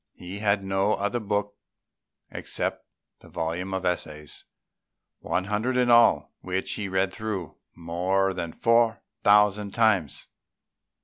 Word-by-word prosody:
He 90 +3 -8
had 100 -1 +1
no 95 +2 +1
other 100 +5 -1
book 105 -1 -2 0.8
except - - -3 0.3
the - - -16
volume 85 +4 -3
of 95 -1 -3
essays, 75 -4 -3 0.7
one 95 - -1
hundred 105 +6 -1
in 125 -1 +3
all, 120 0 +5
which 95 +1 -2
he 100 -2 -4
read 95 0 0
through 105 - -5 0.2
more 90 +3 0
than 85 -3 -4
four 115 +2 +2 0.2
thousand 105 0 +4
times. 110 -9 +2
100 Hz, 125 wpm, -26 LUFS, 90-105 Hz, 0.8 s, all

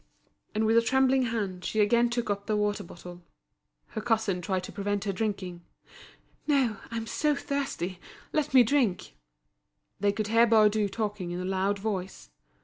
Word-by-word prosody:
And 220 +1 +1
with 225 +1 +4
a - - +7
trembling 265 +2 +3
hand 200 -6 -3
she 220 - -2
again 235 +3 +4
took 240 -2 -1
up 200 0 -4
the 215 - +1
water 210 0 0
bottle. 175 +1 -11 0.7
Her 220 - -5
cousin 215 -5 0
tried 185 +1 -1
to - - -7
prevent 205 0 -2
her 205 - -1
drinking. 185 -4 -3 0.9
"No, 265 -8 +2
I'm 230 -1 -4
so 300 +5 +1
thirsty, 265 -12 -3 0.3
let 305 -2 0
me 260 -2 +7
drink." 235 -6 0 0.8
They 205 0 +2
could 210 0 -3
hear 230 +1 +5
Baudu 215 -2 +4
talking 210 -4 -3
in 175 +1 -4
a 180 - -3
loud 190 +2 0
voice. 190 - -4
210 Hz, 165 wpm, -28 LUFS, 190-230 Hz, 0.9 s, a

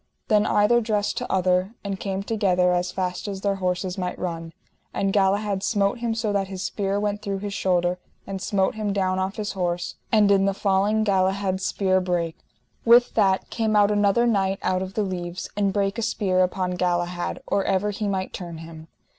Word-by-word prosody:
Then 210 -2 +4
either 225 +4 +4
dressed 210 -2 -1
to - - -5
other, 185 +3 +1
and 200 -2 -4
came 195 -1 -3
together 185 -4 +2
as 180 0 0
fast 180 +1 -3
as 195 -1 -5
their 200 -1 0
horses 185 0 -2
might 180 -1 -3
run, 165 -2 -4 0.4
and 195 -1 0
Galahad 200 0 +1
smote 200 +3 +1
him 230 -1 -1
so 220 -2 -1
that 195 -1 0
his 190 -1 -6
spear 195 +1 -1
went 205 0 -2
through 200 -1 -3
his 200 +1 -5
shoulder, 180 -2 +1 0.3
and 195 -1 -5
smote 190 -1 +1
him 215 -2 -2
down 190 -1 0
off 190 +1 -2
his 210 -1 -3
horse, 175 -2 -2
and 210 -2 +5
in 195 -1 +4
the 195 -1 +1
falling 200 +2 +2
Galahad's 190 -1 +1
spear 185 -1 +1
brake. 175 -3 -2 0.4
With 240 +1 +6
that 195 -3 +2
came 220 -2 0
out 205 0 +5
another 205 +3 +3
knight 195 -4 +1
out 185 0 +1
of 190 0 -6
the 215 - +1
leaves, 180 -2 -4
and 200 -1 +1
brake 200 +2 0
a - - -1
spear 195 -4 0
upon 180 0 0
Galahad 175 0 -1
or 200 -1 0
ever 200 +2 +1
he 210 +1 -3
might 190 -1 -2
turn 170 -3 -6
him. 160 0 -10
195 Hz, 195 wpm, -24 LUFS, 185-205 Hz, 0.4 s, With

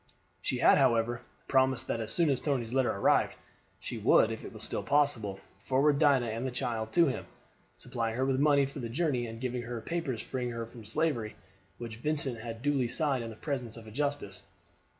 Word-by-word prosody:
She - - -1
had, - - +6
however, 115 +1 +2 0.3
promised 130 -2 +3
that 115 - -2
as 110 -1 -2
soon 165 -4 +3
as 130 - +1
Tony's 125 -6 -1
letter 130 -2 +3
arrived 100 - +2 0.4
she - - -5
would, - - +5
if - - -6
it - - -7
was - - -10
still - - -3
possible, 120 -9 +1 0.2
forward 140 +2 +3
Dinah 140 -5 +4
and 115 +1 -3
the 130 - -1
child 120 -3 -3
to 170 -1 +6
him, 135 - -2 0.5
supplying 115 -1 -3
her 130 - +1
with 135 -1 +1
money 145 -1 +4
for 140 +1 -7
the 120 -3 -4
journey, 130 -3 0
and 115 0 -8
giving 125 0 -2
her 120 0 -5
the 115 - -4
papers 140 -5 -3
freeing 125 -2 -3
her 115 -1 -4
from 115 -1 -12
slavery 115 -2 -1 0.4
which 115 -2 -7
Vincent 140 -2 -1
had 115 +1 -7
duly 140 -4 +2
signed 135 0 0
in 115 - -5
the 110 - -9
presence 125 -3 -4
of 115 - -10
a 110 - -10
justice. 140 -6 -3
125 Hz, 210 wpm, -30 LUFS, 115-140 Hz, 0.5 s, had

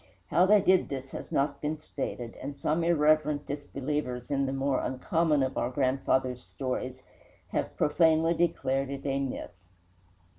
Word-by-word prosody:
How 180 +2 +5
they 210 0 +6
did 185 -1 +3
this 135 -1 -5
has - - -7
not 140 0 0
been 155 +1 -1
stated, 125 -5 -5
and 140 +1 -6
some 155 +4 0
irreverent 155 -3 +3
disbelievers 140 -3 -4
in 140 -1 +1
the - - -1
more 135 -1 0
uncommon 150 +2 +1
of 130 - -1
our 120 - 0
grandfathers' 130 -1 0
stories 130 -1 -4 0.5
have - - -2
profanely 160 +1 +3
declared 135 -5 0
it 140 0 -6
a 135 -1 0
myth. 135 -5 -4
140 Hz, 150 wpm, -29 LUFS, 130-155 Hz, 0.5 s, they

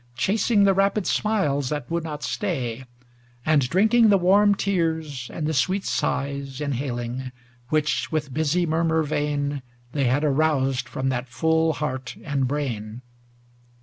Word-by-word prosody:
Chasing 205 - +2
the 195 -1 +5
rapid 195 +1 +1
smiles 145 -11 0
that 145 -3 -4
would 170 -1 -1
not 150 -2 -6
stay. 130 - -3 0.6
And 145 -5 +3
drinking 220 - +4
the 200 - +6
warm 200 +3 +4
tears, 160 -9 -1
and 155 - -4
the 160 - 0
sweet 185 +7 +1
sighs 140 -1 -2
Inhaling, 130 -3 -3 0.4
which, 150 -5 0
with 150 -4 -2
busy 160 +4 +1
murmur 160 0 +1
vain. 145 -1 -1 0.3
They 140 -1 0
had 130 +5 +2
aroused 135 -3 +1
from 135 0 -2
that 125 -1 -3
full 160 +5 +2
heart 130 -4 -4
and 140 -4 0
brain. 125 -5 -4
150 Hz, 140 wpm, -24 LUFS, 130-170 Hz, 0.6 s, the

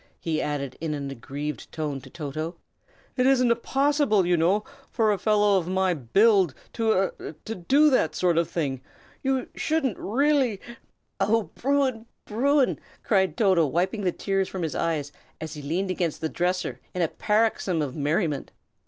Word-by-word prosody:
he 160 -2 -1
added, 140 -3 -3
in 160 -2 -2
an 140 -1 -5
aggrieved 140 +4 -6
tone, 150 -4 -3
to - - -13
Toto. 155 +2 -5 0.6
"It 250 0 +3
isn't 245 -3 +3
possible, 275 - +2
you 175 0 +3
know, 180 +6 +2 0.3
for 220 -3 +2
a 200 - 0
fellow 205 -1 +3
of 170 - -6
my 185 0 +1
build 185 - +3 0.2
to 220 -5 +1
a - - -6 0.2
do 280 - +4
that 160 - +2
sort 175 -2 +2
of 170 - 0
thing. 135 -6 -2 0.4
You 265 -1 0
shouldn't, 305 - -1
really 265 -2 +1 0.3
" - - -49
"Oh, 210 +2 +1
Bruin! 260 -4 0 0.2
Bruin!" 270 +5 +2 0.2
cried 190 -3 +2
Toto, 190 -8 +4
wiping 180 - 0
the 185 -2 +1
tears 195 0 -1
from 185 -2 -4
his 160 -4 -2
eyes, 155 -4 -1 0.3
as 160 - -6
he 150 - -7
leaned 175 +7 -1
against 175 -4 -2
the 160 - -2
dresser 175 -8 -1 0.2
in 180 - +1
a - - +3
paroxysm 210 -5 +1
of 135 -3 -5
merriment. 150 0 -1
185 Hz, 165 wpm, -26 LUFS, 155-225 Hz, 0.6 s, do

